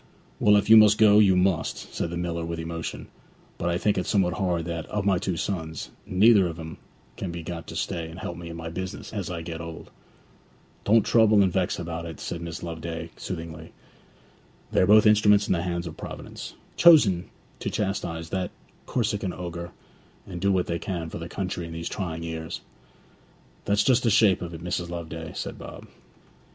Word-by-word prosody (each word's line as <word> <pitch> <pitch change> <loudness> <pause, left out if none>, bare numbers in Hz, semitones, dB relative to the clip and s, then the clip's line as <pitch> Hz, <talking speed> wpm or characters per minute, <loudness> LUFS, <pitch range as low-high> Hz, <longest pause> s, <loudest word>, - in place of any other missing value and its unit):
'Well, 105 0 +5
if 100 - +1
you 110 +1 +9
must 105 -1 +7
go, 105 -1 +7
you 95 -3 +6
must,' 90 -2 0
said 85 - -2
the 85 - -4
miller 85 -1 -2
with 85 0 -4
emotion; 85 0 -5 0.5
'but 85 - 0
I 85 - +1
think 100 +1 +1
it 90 - -3
somewhat 95 -4 +2
hard 85 -2 -1
that, 85 -1 -4
of 105 -1 -2
my 95 -3 +3
two 90 -2 -2
sons, 80 -3 -4 0.2
neither 105 +3 +6
one 90 - +1
of 85 0 -8
'em 80 0 -7 0.4
can 90 - -4
be 85 0 -6
got 85 0 -6
to - - -8
stay 80 -1 -3
and 80 - -10
help 85 - -5
me 85 0 -8
in 85 - -7
my 85 0 -6
business 95 +4 -6
as 100 -4 -3
I 85 -2 -4
get 80 0 -6
old.' 80 -1 -9 0.9
'Don't 110 +1 +5
trouble 110 -3 +5
and 95 -3 +1
vex 95 -2 0
about 85 0 -5
it,' 80 -3 -8
said 85 - -5
Mrs. 85 -1 -6
Loveday 80 0 -5
soothingly. 80 -2 -7 1.0
'They - - +3
are 90 - +4
both 105 +1 +7
instruments 105 -1 +5
in - - +1
the 85 - 0
hands 85 0 -2
of 80 - -7
Providence, - - -8 0.2
chosen 110 - +6 0.3
to - - -2
chastise 85 -5 -3
that 95 -1 -1 0.4
Corsican 105 -5 -1
ogre, 85 -1 -6 0.5
and 90 -2 -7
do 100 +1 +3
what 95 -2 +2
they 85 0 -2
can 85 -4 -4
for - - -5
the 85 +1 -7
country 90 -3 -4
in 85 - -8
these 80 0 -4
trying 85 -4 -4
years.' 80 -1 -5 1.0
'That's 100 +1 +3
just 130 -2 +4
the 120 - +2
shape 105 -3 +4
of 85 -1 -5
it, 80 - -9
Mrs. 90 -1 -2
Loveday,' 85 -1 -6
said - - -5
Bob. - - -9
85 Hz, 200 wpm, -26 LUFS, 85-100 Hz, 1.0 s, you